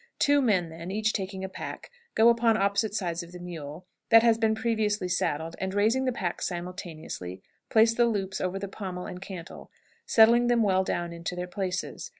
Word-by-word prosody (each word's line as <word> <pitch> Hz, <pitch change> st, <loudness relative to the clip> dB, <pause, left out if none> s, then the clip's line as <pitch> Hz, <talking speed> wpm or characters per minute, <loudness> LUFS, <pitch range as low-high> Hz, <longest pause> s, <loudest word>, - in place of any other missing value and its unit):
Two 285 Hz, 0 st, +4 dB
men 190 Hz, -9 st, +2 dB
then, 165 Hz, +2 st, -8 dB
each 215 Hz, +2 st, 0 dB
taking 190 Hz, -1 st, -4 dB
a -, -, -2 dB
pack, 190 Hz, -, -8 dB, 0.2 s
go 225 Hz, +1 st, +6 dB
upon 230 Hz, -1 st, +3 dB
opposite 200 Hz, +1 st, +1 dB
sides 175 Hz, -4 st, -2 dB
of 170 Hz, 0 st, -11 dB
the -, -, -7 dB
mule, 165 Hz, -1 st, -8 dB, 0.2 s
that 225 Hz, -1 st, +8 dB
has 230 Hz, -1 st, +4 dB
been 220 Hz, -1 st, +2 dB
previously 220 Hz, -4 st, 0 dB
saddled, 165 Hz, -2 st, -1 dB
and, 190 Hz, 0 st, -3 dB
raising 225 Hz, +6 st, +2 dB
the 255 Hz, -, +1 dB
packs 185 Hz, -7 st, -2 dB
simultaneously, 170 Hz, -, -6 dB, 0.3 s
place 225 Hz, +1 st, +5 dB
the 240 Hz, +1 st, +3 dB
loops 195 Hz, -4 st, -2 dB
over 185 Hz, +1 st, -1 dB
the 200 Hz, +1 st, -4 dB
pommel 185 Hz, -2 st, -6 dB
and 180 Hz, -, -7 dB
cantel, 185 Hz, -3 st, -9 dB, 0.4 s
settling 235 Hz, +2 st, +6 dB
them 240 Hz, -1 st, +3 dB
well 190 Hz, -2 st, +3 dB
down 175 Hz, -2 st, -2 dB
into 170 Hz, +1 st, -5 dB
their 180 Hz, 0 st, -3 dB
places. 185 Hz, -, -4 dB
190 Hz, 190 wpm, -27 LUFS, 180-220 Hz, 0.4 s, that